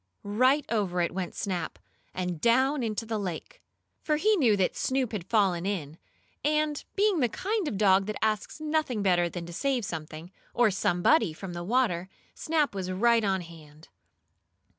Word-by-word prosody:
Right 255 +8 +2
over 200 -6 -1
it 170 - -1
went 185 -1 -4
Snap, 185 -3 -3 0.3
and 180 -3 -4
down 260 +4 +3
into 225 -1 -2
the 220 -1 -2
lake. 180 -5 -6 0.4
For 305 - +1
he 420 +8 +3
knew 240 - +3
that 190 - +1
Snoop 260 -3 -1
had 200 -5 -5
fallen 195 -6 +2
in, 170 -5 -4 0.4
and, 300 0 0
being 405 -3 +2
the 245 -4 +2
kind 400 - -2
of 235 - -2
a - - -3
dog 195 -1 +4
that 215 - -3
asks 215 +5 -1
nothing 305 -8 -1
better 175 -3 +3
than 170 0 -6
to 170 - -9
save 260 +2 0
something, 160 0 -7 0.2
or 240 -3 +4
somebody, 180 - +2
from 180 +3 -8
the 175 0 -5
water, 195 -4 0 0.2
Snap 310 -5 0
was 190 -2 -4
right 230 +4 +3
on 190 -2 +1
hand. 155 -3 -14
205 Hz, 175 wpm, -28 LUFS, 180-260 Hz, 0.4 s, dog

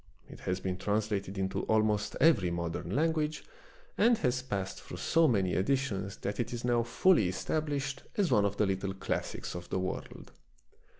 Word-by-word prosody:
It - - -12
has 90 0 -2
been 95 -1 -3
translated 105 -1 -1
into 95 0 -1
almost 110 -1 +1
every 140 - +5
modern 85 -1 -3
language, 155 +1 0 0.6
and 235 0 +5
has 125 -5 0
passed 100 -7 -4
through - - -9
so 165 0 +3
many 95 -8 +2
editions 100 -3 0
that 100 - -3
it 120 - -1
is 120 0 -4
now 120 -1 +3
fully 120 - +3
established 140 - -2 0.2
as 200 -5 +2
one 105 - +5
of 100 0 0
the 105 - +3
little 95 0 -2
classics 95 - -3
of 90 0 -7
the - - -1
world. 95 0 -5
105 Hz, 170 wpm, -31 LUFS, 95-135 Hz, 0.6 s, every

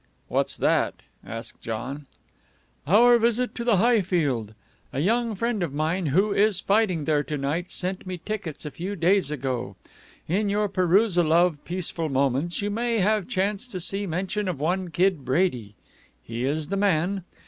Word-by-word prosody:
"What's - - 0
that?" - - +2 0.3
asked 115 +1 -8
John. 130 +6 -5 0.8
"Our 235 +7 +6
visit 235 +2 +1
to 235 - -4
the 235 -3 +3
Highfield. 175 - +1 0.4
A 135 - -3
young 225 +6 +1
friend 230 0 -1
of 155 -5 -2
mine 160 +3 0
who 195 +9 +2
is 205 -2 +3
fighting 195 -7 +1
there 150 -2 +2
to 150 - -3
night 150 +6 -2
sent 185 +1 -3
me 185 -1 -4
tickets 180 -6 -5
a 150 - -4
few 190 +7 -5
days 180 -1 +2
ago. 130 -7 -3 0.5
In 200 +5 +1
your 205 +1 +1
perusal 185 -2 +3
of 170 -3 +3
Peaceful 170 -2 -3
Moments 140 +7 0
you 205 - -1
may 230 +2 0
have 210 -1 +2
chanced 200 +5 -1
to 185 - -3
see 195 +3 -2
mention 190 +4 -2
of 175 -7 -3
one 180 +4 -1
Kid 175 -2 +1
Brady. 130 - 0 0.5
He 115 - -4
is 150 +2 -1
the 195 - -1
man. 190 -1 +1
180 Hz, 165 wpm, -25 LUFS, 150-205 Hz, 0.8 s, Our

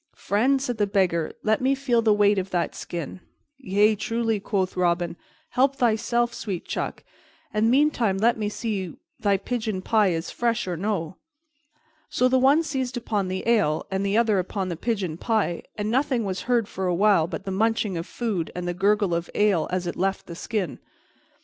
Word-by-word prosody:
"Friend," 255 +7 +1
said 245 -4 -3
the 205 - +2
Beggar, 185 -5 +1
"let 220 +2 +2
me 265 +1 +2
feel 255 -4 +1
the 220 -1 +3
weight 205 -1 +4
of 190 +1 -4
that 175 -2 -1
skin. 170 +1 -6 0.4
"Yea, 210 -2 +3
truly," 225 0 -1
quoth 195 -2 -1
Robin, 175 -1 +1 0.3
"help 270 +2 +2
thyself, 235 -1 +1
sweet 195 -7 -5
chuck, - - -4 0.5
and 215 +2 +2
meantime 250 -7 +2
let 230 +4 +3
me 210 -2 -2
see 210 -4 -3
whether 165 - -11 0.2
thy 200 -2 +2
pigeon 215 -2 -3
pie 215 -1 +3
is 165 -2 -2
fresh 235 -3 -1
or 180 - -2
no." 185 -2 -2 0.9
So 255 - +2
the 260 0 +3
one 280 +5 +5
seized 265 -4 -3
upon 210 -5 -1
the 185 +3 -4
ale 205 -10 +2
and 190 0 -1
the 200 +2 +1
other 220 -4 +3
upon 185 +1 -3
the 170 - -3
pigeon 190 -4 -2
pie, 215 -5 0 0.2
and 210 0 -2
nothing 255 -2 +1
was 190 -1 -3
heard 235 -4 +2
for 190 -2 -3
a 180 - +1
while 195 -4 +4
but 165 -2 -6
the 195 - -3
munching 215 0 +1
of 165 +2 -4
food 210 -9 -2
and 180 0 -4
the 175 - -1
gurgle 200 0 +2
of 170 0 -2
ale 200 -7 +2
as 185 0 -2
it 175 - -3
left 195 +1 -1
the 170 - -8
skin. 185 -1 -3
205 Hz, 195 wpm, -25 LUFS, 185-235 Hz, 0.9 s, one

